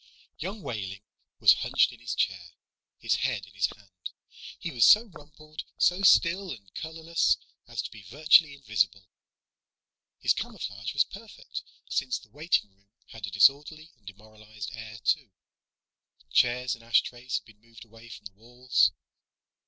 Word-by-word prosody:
Young 195 Hz, +5 st, -6 dB
Wehling 100 Hz, -3 st, -5 dB, 0.4 s
was -, -, +8 dB
hunched -, -, +2 dB
in 120 Hz, -, -14 dB
his 120 Hz, 0 st, -5 dB
chair, 90 Hz, -3 st, -2 dB, 0.4 s
his -, -, 0 dB
head 125 Hz, -7 st, -1 dB
in 95 Hz, -, -19 dB
his 100 Hz, 0 st, +1 dB
hand. 95 Hz, -3 st, -11 dB, 0.5 s
He 170 Hz, -, -5 dB
was 120 Hz, -5 st, +2 dB
so 215 Hz, -, +8 dB
rumpled, 155 Hz, -5 st, -12 dB, 0.2 s
so 180 Hz, +2 st, +3 dB
still 190 Hz, 0 st, +4 dB
and 100 Hz, -7 st, -11 dB
colorless 160 Hz, +1 st, 0 dB, 0.3 s
as -, -, -4 dB
to -, -, -7 dB
be 105 Hz, -, -12 dB
virtually 155 Hz, +2 st, +5 dB
invisible. 100 Hz, -7 st, -1 dB, 1.1 s
His -, -, +2 dB
camouflage 100 Hz, 0 st, -5 dB
was 140 Hz, -, +5 dB
perfect, 220 Hz, -, -9 dB, 0.3 s
since 255 Hz, -, -1 dB
the -, -, -16 dB
waiting 150 Hz, -, 0 dB
room 100 Hz, +1 st, -35 dB, 0.2 s
had 110 Hz, -3 st, -7 dB
a -, -, -5 dB
disorderly 145 Hz, -, +2 dB
and 105 Hz, -5 st, -35 dB
demoralized 105 Hz, 0 st, -10 dB
air, 110 Hz, 0 st, -9 dB
too. 150 Hz, -7 st, +1 dB, 1.0 s
Chairs 125 Hz, +1 st, +2 dB
and 115 Hz, -, -10 dB
ashtrays 120 Hz, +1 st, 0 dB
had -, -, -8 dB
been 110 Hz, -2 st, -20 dB
moved 115 Hz, -1 st, -15 dB
away 115 Hz, +1 st, -16 dB
from 105 Hz, -, -11 dB
the 100 Hz, -, -9 dB
walls. 120 Hz, -3 st, +1 dB
115 Hz, 150 wpm, -28 LUFS, 105-155 Hz, 1.1 s, was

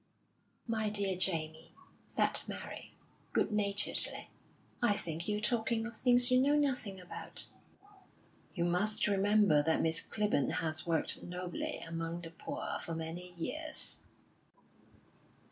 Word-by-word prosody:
"My 220 Hz, -2 st, -1 dB
dear 200 Hz, -2 st, +2 dB
Jamie," 160 Hz, -4 st, +2 dB, 0.3 s
said -, -, +2 dB
Mary, -, -, -8 dB, 0.4 s
good -, -, +1 dB
naturedly, 205 Hz, -1 st, 0 dB, 0.5 s
"I 240 Hz, -4 st, +4 dB
think 170 Hz, -3 st, -3 dB
you're 210 Hz, 0 st, -1 dB
talking 225 Hz, +1 st, 0 dB
of 235 Hz, 0 st, -7 dB
things 245 Hz, 0 st, +5 dB
you 255 Hz, 0 st, +5 dB
know 285 Hz, +2 st, +3 dB
nothing 255 Hz, -9 st, -1 dB
about." 180 Hz, -, +1 dB, 1.1 s
"You 170 Hz, -2 st, 0 dB
must 180 Hz, +5 st, +2 dB
remember 200 Hz, -5 st, +3 dB
that 160 Hz, +2 st, +1 dB
Miss 160 Hz, 0 st, +4 dB
Clibborn 210 Hz, -10 st, 0 dB
has 155 Hz, 0 st, -2 dB
worked 165 Hz, -2 st, -1 dB
nobly 180 Hz, 0 st, -5 dB
among 165 Hz, +1 st, -5 dB
the 165 Hz, -1 st, -8 dB
poor 165 Hz, -, -5 dB
for 165 Hz, -, -4 dB
many 165 Hz, +3 st, -5 dB
years." 310 Hz, -, +1 dB
195 Hz, 125 wpm, -33 LUFS, 165-220 Hz, 1.1 s, things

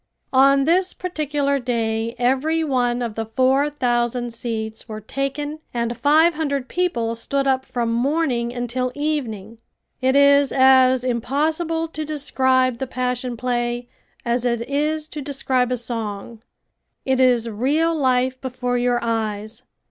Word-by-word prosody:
On 275 Hz, +1 st, +5 dB
this 360 Hz, +5 st, +2 dB
particular 295 Hz, -5 st, -1 dB
day 230 Hz, -2 st, -2 dB
every 270 Hz, +7 st, +1 dB
one 245 Hz, -4 st, 0 dB
of 230 Hz, -2 st, -3 dB
the 225 Hz, 0 st, -4 dB
four 260 Hz, +5 st, +2 dB
thousand 240 Hz, -3 st, -1 dB
seats 225 Hz, -1 st, -5 dB
were 215 Hz, 0 st, -5 dB
taken 275 Hz, +6 st, -4 dB, 0.2 s
and 235 Hz, 0 st, -1 dB
five 305 Hz, +7 st, +4 dB
hundred 280 Hz, -4 st, -2 dB
people 245 Hz, -11 st, -1 dB
stood 275 Hz, +4 st, -2 dB
up 265 Hz, -1 st, +1 dB
from 235 Hz, -2 st, -1 dB
morning 250 Hz, -2 st, 0 dB
until 245 Hz, +1 st, -2 dB
evening. 235 Hz, -8 st, -3 dB, 0.4 s
It 260 Hz, +1 st, +2 dB
is 280 Hz, 0 st, +5 dB
as 260 Hz, -1 st, +5 dB
impossible 310 Hz, +7 st, -1 dB
to 310 Hz, -1 st, -4 dB
describe 260 Hz, -4 st, +1 dB
the 265 Hz, -, -3 dB
Passion 250 Hz, -1 st, -3 dB
Play 240 Hz, 0 st, -2 dB, 0.4 s
as 240 Hz, 0 st, 0 dB
it 235 Hz, -1 st, -1 dB
is 300 Hz, +2 st, -1 dB
to 300 Hz, -, -6 dB
describe 265 Hz, -3 st, 0 dB
a 250 Hz, -, 0 dB
song. 225 Hz, -2 st, -5 dB, 0.6 s
It 265 Hz, -1 st, +1 dB
is 245 Hz, -3 st, +3 dB
real 285 Hz, +10 st, +1 dB
life 255 Hz, -3 st, +1 dB
before 250 Hz, -1 st, -2 dB
your 245 Hz, 0 st, +2 dB
eyes. 220 Hz, -1 st, -3 dB
255 Hz, 140 wpm, -21 LUFS, 235-280 Hz, 0.6 s, On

